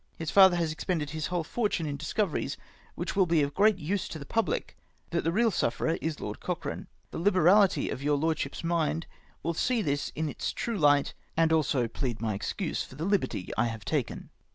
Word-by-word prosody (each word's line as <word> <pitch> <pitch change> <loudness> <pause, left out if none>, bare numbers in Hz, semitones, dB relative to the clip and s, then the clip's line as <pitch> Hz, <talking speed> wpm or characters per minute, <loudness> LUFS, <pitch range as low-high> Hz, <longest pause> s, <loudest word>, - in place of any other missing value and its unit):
His 165 -2 -3
father 190 -2 +7
has 165 -2 0
expended 155 -2 -2
his 155 -1 -3
whole 175 -1 -1
fortune 205 -2 -1
in 145 -2 -2
discoveries 155 0 -1 0.4
which 175 +1 -4
will 190 -2 +4
be 165 -3 +3
of 140 0 -2
great 210 0 +4
use 185 +4 -2
to - - -6
the 140 - -8
public 225 +9 -1 0.2
— - - -38
but 170 - 0
the 165 - +1
real 225 +5 +3
sufferer 165 -2 0
is 160 -1 -2
Lord 105 - -5
Cochrane. - - -4 0.2
The - - -5
liberality 190 +2 +4
of 130 - -4
your 145 +1 +2
Lordship's 155 -1 -1
mind 165 -1 0 0.4
will 170 - 0
see 235 +6 +1
this 145 -1 -1
in 160 0 -1
its 145 - -3
true 230 -4 -3
light, 145 -2 +4 0.2
and 160 0 +4
also 145 -6 +2
plead 120 0 -3
my 110 -2 -1
excuse 100 - -2
for - - -8
the 155 +4 -3
liberty 195 - 0
I 120 - +2
have 115 -3 -5
taken. - - -2
160 Hz, 205 wpm, -29 LUFS, 145-185 Hz, 0.4 s, father